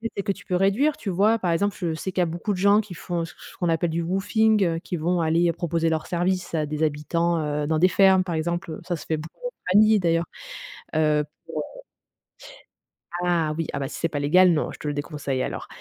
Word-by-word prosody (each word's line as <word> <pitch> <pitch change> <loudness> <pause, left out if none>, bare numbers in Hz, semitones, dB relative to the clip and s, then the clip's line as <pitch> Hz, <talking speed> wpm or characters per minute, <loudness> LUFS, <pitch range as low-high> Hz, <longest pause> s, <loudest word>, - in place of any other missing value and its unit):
celles 200 - -2
que 200 - 0
tu - - -8
peux 180 - -1
réduire, 200 +11 +2
tu 205 - -5
vois? 205 +5 +3
Par 180 -3 0
exemple, 200 +4 0
je 170 -3 -1
sais 185 +4 -4
qu'il 185 - 0
y - - +4
a - - +1
beaucoup 170 +5 -3
de - - -4
gens 200 +3 +4
qui 205 -4 -10
font 170 +1 -3
c 165 - -11
c - - -30
ce - - -18
qu'on 175 - 0
appelle 165 +1 +1
du 170 - -1
woofing, 205 +4 +2
heu, 165 -1 0
qui 180 - -5
vont 175 +3 0
aller 165 +2 +2
proposer 165 -1 -1
leurs 160 -1 -2
services 180 0 -1
à 155 - 0
des 150 +1 -4
habitants, 165 +3 0
heu, 150 0 -2
dans 160 - +1
des 185 - +5
fermes, 190 -1 +5
par 175 - -4
exemple. 170 +2 -2
Heu, 155 - -7
ça 175 - 0
se 160 - -9
fait 160 - -1
beaucoup 165 - -10
en - - -5 0.2
famille, 215 +1 +6
d'ailleurs, 165 -1 +1 0.7
heu 150 -1 +3 0.4
pour - - -11
heu - - -9 1.4
Ah, 165 -3 +1
oui, 165 -2 -2
ah, 140 - -2
bah, 135 - -2
si - - -7
c'est 165 - 0
pas 145 - -3
légal, 180 +6 +5
non, 155 -2 0
je - - -11
te 150 - -6
le 145 - -1
déconseille 145 -3 -3
alors. - - -5
170 Hz, 255 wpm, -24 LUFS, 160-190 Hz, 1.4 s, famille